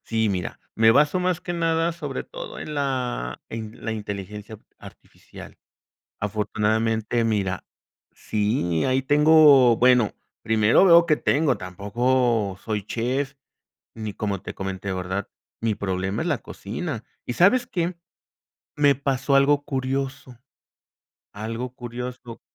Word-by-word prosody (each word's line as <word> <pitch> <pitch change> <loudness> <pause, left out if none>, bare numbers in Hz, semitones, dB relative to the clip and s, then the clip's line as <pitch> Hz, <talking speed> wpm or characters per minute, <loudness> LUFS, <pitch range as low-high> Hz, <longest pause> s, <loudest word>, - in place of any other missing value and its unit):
Sí, 110 -1 0
mira, 90 -3 -3 0.2
me 110 0 +6
baso, 150 +7 +3
más 180 -1 0
que 175 - -4
nada, 165 0 +1
sobre 150 -5 -5
todo - - -8
en 155 - -6
la 125 - -2
en 110 -1 -7
la 115 - -1
inteligencia 105 0 -6 0.2
artificial. - - -14 0.6
Afortunadamente, 110 +2 0
mira 100 -4 -1 0.5
sí, 105 - 0
ahí 130 0 +1
tengo, 145 -4 +6
bueno, 125 -3 +4 0.3
primero 110 - +4
veo 170 -2 +7
que 155 -2 +3
tengo, 145 -4 +1
tampoco 105 +3 0
soy 105 -3 -3
chef, 130 +5 -2 0.6
ni 110 -2 -6
como 100 -3 -3
te - - -8
comenté, 95 0 -4
¿verdad? 95 +2 -3 0.3
Mi 110 -2 0
problema 95 -1 -2
es - - -2
la - - +1
cocina, 115 - -6 0.2
¿y - - -2
sabes 235 - +4
qué? 175 -3 -2 0.8
Me 145 -1 +4
pasó 135 0 0
algo 140 +1 +4
curioso, 135 -2 -3 1.0
algo 115 +4 -4
curioso. 120 -1 -7
120 Hz, 125 wpm, -24 LUFS, 105-140 Hz, 1.0 s, veo